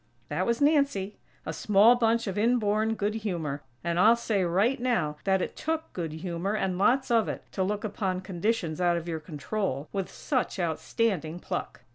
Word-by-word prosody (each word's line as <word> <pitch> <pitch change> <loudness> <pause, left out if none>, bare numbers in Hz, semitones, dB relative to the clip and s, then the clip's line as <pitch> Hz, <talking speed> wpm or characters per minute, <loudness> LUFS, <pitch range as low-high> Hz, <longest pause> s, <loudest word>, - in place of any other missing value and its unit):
_" - - -39
That 155 +6 -1
was 235 +3 0
Nancy; 280 -10 +2 0.3
a - - -3
small 210 +3 +5
bunch 230 -1 +2
of 195 -3 -3
inborn 220 -1 +2
good 210 0 -1
humor; 170 -10 -3 0.2
and 170 0 0
I'll 225 +5 +7
say, 215 -4 0
right 195 +10 +2
now, 185 -12 0
that 190 -1 +2
it - - -5
took 320 0 -3
good 165 -3 -3
humor, 175 +5 -3
and 185 -3 -1
lots 255 +6 +3
of 225 -2 +3
it, - - -5
to 190 - -3
look 205 +2 -1
upon 190 -3 -2
conditions 185 -2 -1
out 175 -1 +3
of 170 0 -5
your 165 -2 -2
control, 155 -1 -3
with 195 -2 -2
such 260 -7 -2
outstanding 170 0 -1
pluck! 125 - -5
195 Hz, 185 wpm, -28 LUFS, 175-225 Hz, 0.3 s, I'll